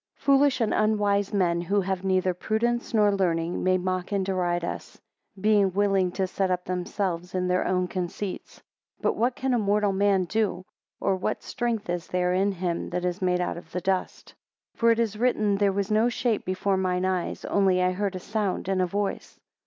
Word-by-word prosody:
FOOLISH 275 -2 +3
and 220 - +1
unwise 205 -2 +1
men, 175 -4 +1
who 200 +4 +1
have 190 0 -2
neither 185 -1 +1
prudence, 235 +6 -1
nor 210 -2 +4
learning, 170 -3 0
may 185 0 +3
mock 185 +1 -2
and 195 -2 0
deride 175 -2 0
us; - - -7 0.4
being 205 -1 +3
willing 195 -2 +2
to 190 - 0
set 190 +1 -1
up 180 -1 -1
themselves 180 -1 -3
in 180 0 0
their 180 0 +1
own 185 -1 +1
conceits. 185 +2 -5 0.4
2 - - -31
But - - +2
what 245 +2 +1
can 265 -1 -1
a 240 - +2
mortal 205 -1 +1
man 195 -1 +2
do? 190 -1 -1 0.3
Or 195 - +1
what 185 - -3
strength 235 -3 -2
is 175 0 -3
there 180 0 0
in 195 +2 +2
him 175 -2 -3
that 180 0 -2
is 180 +2 -2
made 180 -1 +1
out 180 - -2
of 175 - -12
the 180 - -1
dust? 190 0 -2 0.4
3 - - -32
For 230 - +4
it 230 - +2
is 220 -2 -1
written, 215 -5 +2
there 200 -1 +3
was 200 +2 -2
no 220 +3 +3
shape 235 -2 -1
before 190 +1 0
mine 185 -1 0
eyes; 185 -2 -2
only 190 -2 +2
I 180 - +2
heard 195 +1 -2
a - - -4
sound 205 -2 -2
and 190 -1 +1
a 180 - +1
voice. 200 +2 -3
190 Hz, 205 wpm, -26 LUFS, 180-210 Hz, 0.4 s, nor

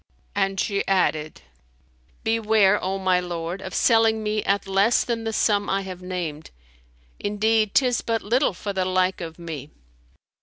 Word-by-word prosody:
'" - - -39
And 195 -1 0
she 200 -2 0
added, 155 -5 0 0.8
"Beware, 220 -3 +3
O 190 +1 -1
my 185 -1 +2
lord, 175 +1 -4
of 190 - -7
selling 225 -2 +3
me 210 0 0
at 200 +1 +1
less 195 +4 +3
than 230 -2 -3
the 225 - -1
sum 205 -2 +1
I 195 +1 +1
have 185 -2 -8
named; 175 -4 -5 0.7
indeed 215 +1 +1
'tis 250 -3 +3
but 225 -1 -2
little 245 +3 +2
for 200 +2 -5
the 190 -1 0
like 185 0 0
of 165 -1 -7
me." 160 -5 -7
195 Hz, 160 wpm, -24 LUFS, 185-220 Hz, 0.8 s, Beware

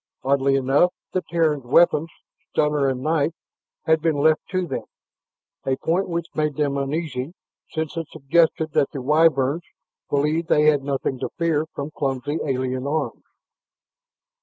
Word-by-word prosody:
Oddly 135 0 +2
enough, 135 +6 +3 0.2
the 185 - 0
Terrans' 160 -5 +1
weapons, 160 +4 +4 0.4
stunner 150 -2 +1
and 130 -1 -3
knife, 155 0 +1 0.5
had 160 0 +3
been 160 -1 +1
left 155 +2 +3
to 185 -2 -1
them, - - -4 0.8
a 135 - 0
point 180 +7 0
which 170 -1 -2
made 150 -2 0
them 145 -2 0
uneasy, 140 +1 -3 0.3
since 160 -2 -3
it 165 -2 -3
suggested 160 +2 +1
that 140 - +2
the 140 - -6
Wyverns 150 +1 +3 0.5
believed 150 +3 +1
they 150 - +4
had 150 -2 +4
nothing 135 -2 -2
to 130 - -3
fear 160 -2 +1
from 140 +2 -4
clumsy 140 +1 -2
alien 130 -1 -2
arms. 155 +2 -2
150 Hz, 145 wpm, -23 LUFS, 135-160 Hz, 0.8 s, weapons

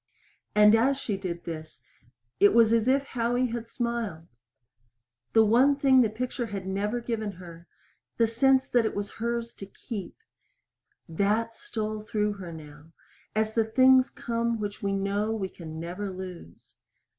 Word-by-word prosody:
And 210 0 +7
as 260 +5 +3
she 220 -6 -3
did 180 -3 -5
this 160 -2 -8 0.6
it 205 +2 +5
was 230 -1 +6
as 230 0 +2
if 270 +2 +3
Howie 245 -1 -1
had 235 -1 -4
smiled. 230 -9 -3 1.1
The 225 -1 +6
one 255 +6 +4
thing 270 -2 +5
the 225 - +3
picture 240 +2 -3
had 200 -3 -5
never 205 +5 -1
given 220 -3 -3
her 170 -1 -12 0.5
the 230 - +4
sense 265 +4 +3
that 240 -2 +4
it 220 - -2
was 205 0 -3
hers 235 0 -2
to 195 - -10
keep 200 -2 -7 0.9
that 210 +7 0
stole 215 -1 -4
through 210 -1 -1
her 185 -4 -8
now 150 -2 -11 0.5
as 215 0 0
the 225 - +3
things 260 +3 +5
come 230 -1 -2
which 205 -1 -5
we 200 - -1
know 200 +2 -1
we 195 -3 -3
can 160 -3 -9
never 180 +5 -5
lose. 185 - -10
215 Hz, 155 wpm, -27 LUFS, 195-235 Hz, 1.1 s, And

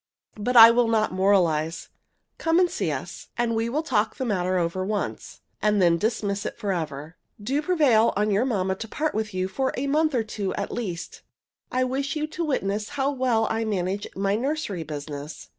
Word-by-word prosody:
But 245 +4 +1
I 230 0 +11
will 240 0 +3
not 220 -1 +1
moralize. 175 -5 +1 0.5
Come 330 +1 +2
and 365 - +5
see - - -1
us, - - -6
and 240 -1 +1
we 225 +1 0
will 300 +6 -1
talk 220 -7 +1
over - - -25
the 260 - -2
matter 185 -3 0
once, 205 +1 -4 0.2
and 210 -1 +2
then 170 -2 +4
dismiss 205 -2 -1
it - - -5
forever. 160 -7 -4 0.2
Do 265 +8 -1
prevail 290 -11 +3
on 210 +1 +1
your 205 +4 +2
mamma 195 -7 0
to 225 - -6
part 300 +7 -2
with 215 -1 -2
you 185 0 0 0.3
a 265 - -1
month 305 +1 +1
or 235 - +2
two 210 -3 -4
at - - -3
least. 180 -8 -5 0.5
I 255 +1 +1
wish 270 +3 -2
you 305 0 -1
to 315 +2 -4
witness 210 -8 -1
how 275 +1 +1
well 250 -5 +1
I 225 - 0
manage 200 -1 -2
my 195 +1 0
nursery 260 - -2
business. 145 -1 -7
215 Hz, 190 wpm, -25 LUFS, 185-255 Hz, 0.5 s, I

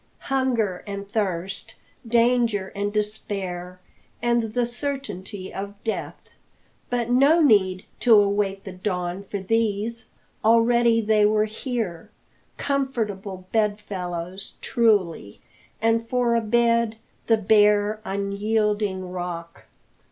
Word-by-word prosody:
Hunger 235 -9 0
and 200 0 -5
thirst, 195 -3 -3 0.3
danger 230 -4 +2
and 205 0 -1
despair, 195 -4 -4 0.4
and 240 0 +2
the 245 0 +2
certainty 235 -7 -5
of 200 +1 -5
death! 225 - -5 0.6
But 240 -1 -1
no 280 +7 +5
need 190 - +3
to 235 -2 +6
await 200 -1 +2
the 190 - -7
dawn 180 -1 -3
for 200 - -5
these; 225 +2 -1 0.3
already 230 +1 +4
they 215 -1 +3
were 215 0 +2
here. 215 -6 -4 0.5
Comfortable 215 -9 -2
bed 210 -2 +1
fellows, 180 -2 -6
truly, 195 - +1 0.4
and 225 0 +2
for 245 -2 +2
a 230 - +2
bed 230 0 +2 0.3
the 225 - +5
bare, 210 0 +3
unyielding 200 -1 -1
rock. 175 -2 -6
210 Hz, 105 wpm, -24 LUFS, 195-230 Hz, 0.6 s, to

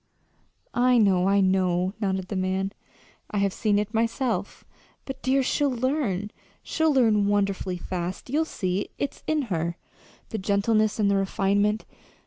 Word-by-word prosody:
"I 250 0 +4
know, 195 -4 +4
I 200 0 +4
know," 185 -1 +2
nodded 190 -3 -1
the 205 - -3
man. 190 +1 -1 0.6
"I 210 - -3
have 200 -1 +1
seen 210 -2 +1
it 210 +2 -2
myself. 230 +2 -1 0.4
But, 270 -1 -7
dear, 265 +1 +2
she'll 285 +2 +1
learn 240 -6 -1 0.3
she'll 320 -1 +1
learn 220 -7 +3
wonderfully 195 -2 0
fast. 180 +1 -5
You'll 300 +5 +1
see. 190 - -2
It's 280 - -4
in 310 -2 +1
her 170 +1 -2 0.5
the 220 - -3
gentleness 210 +2 +1
and 205 -2 +2
the 200 - +3
refinement. 200 +2 +1
205 Hz, 145 wpm, -26 LUFS, 190-240 Hz, 0.6 s, I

